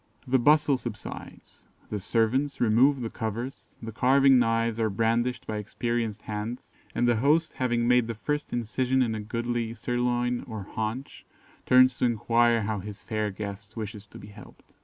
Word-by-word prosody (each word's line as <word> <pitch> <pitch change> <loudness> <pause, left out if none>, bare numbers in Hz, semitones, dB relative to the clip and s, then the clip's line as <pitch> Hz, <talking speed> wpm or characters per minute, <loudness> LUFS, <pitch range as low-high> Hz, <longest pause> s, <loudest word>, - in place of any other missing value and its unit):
The 130 +1 +3
bustle 145 0 +4
subsides, 110 -5 -9 0.3
the 105 - -2
servants 120 +8 0
remove 125 +4 +4
the 115 - -3
covers, 115 +4 -5
the 115 - -5
carving 135 +3 +5
knives 115 -1 +1
are 110 -1 +2
brandished 115 +4 0
by 110 - -3
experienced 115 0 -3
hands, 110 +4 -5 0.2
and 120 - +2
the 120 -2 +3
host 150 +7 +2
having 120 -2 0
made 125 -1 +4
the 115 - -4
first 150 +6 -3
incision 125 +3 0
in 115 -2 -1
a 110 - -3
goodly 115 +1 -3
sirloin 120 +1 -1
or 110 -4 -6
haunch, 110 +6 -5 0.4
turns 130 0 +5
to - - +2
enquire 120 0 +2
how 105 0 -2
his 100 +1 -9
fair 110 -2 -2
guest 105 +2 -7
wishes 105 -1 -6
to - - -13
be 100 - -11
helped. 105 -1 -14
115 Hz, 165 wpm, -27 LUFS, 110-125 Hz, 0.4 s, carving